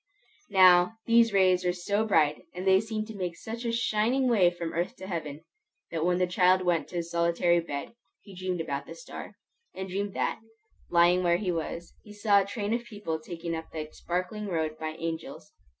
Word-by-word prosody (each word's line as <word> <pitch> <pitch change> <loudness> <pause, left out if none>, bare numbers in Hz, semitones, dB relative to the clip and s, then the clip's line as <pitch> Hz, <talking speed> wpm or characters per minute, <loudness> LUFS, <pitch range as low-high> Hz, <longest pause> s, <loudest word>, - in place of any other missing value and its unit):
Now, 185 +1 +6
these 230 -1 +5
rays 185 -2 +4
were 180 0 +1
so 200 +4 0
bright, 150 -7 +2
and 180 +1 -5
they 190 0 +6
seemed 220 -1 -4
to 220 - -7
make 180 -3 -4
such 230 +2 -6
a 235 - 0
shining 230 +3 +1
way 205 -8 +5
from 175 -1 -5
earth 170 +2 -2
to - - -9
heaven, 160 -5 -5 0.5
that 160 -1 -2
when 180 +1 +2
the 180 - +2
child 185 +1 +3
went 175 -3 +1
to - - -11
his 170 -1 -3
solitary 170 0 +2
bed, 145 -1 -5 0.3
he 200 - -14
dreamed 185 -1 -3
about 140 -3 -4
the - - -8
star; - - -9 0.4
and 190 0 -5
dreamed 200 +1 -3
that, - - -1 0.5
lying 175 +1 +4
where 175 -1 +3
he 185 -1 -1
was, 170 0 -4
he 210 - -13
saw 205 -1 +4
a - - -3
train 205 +1 -3
of 235 0 -1
people 205 -8 -5
taken 165 +1 -6
up 160 0 -5
that 155 -1 -6
sparkling 185 +4 -3
road 160 -4 -1
by 155 0 -4
angels. 165 -1 -6
180 Hz, 200 wpm, -28 LUFS, 170-205 Hz, 0.5 s, Now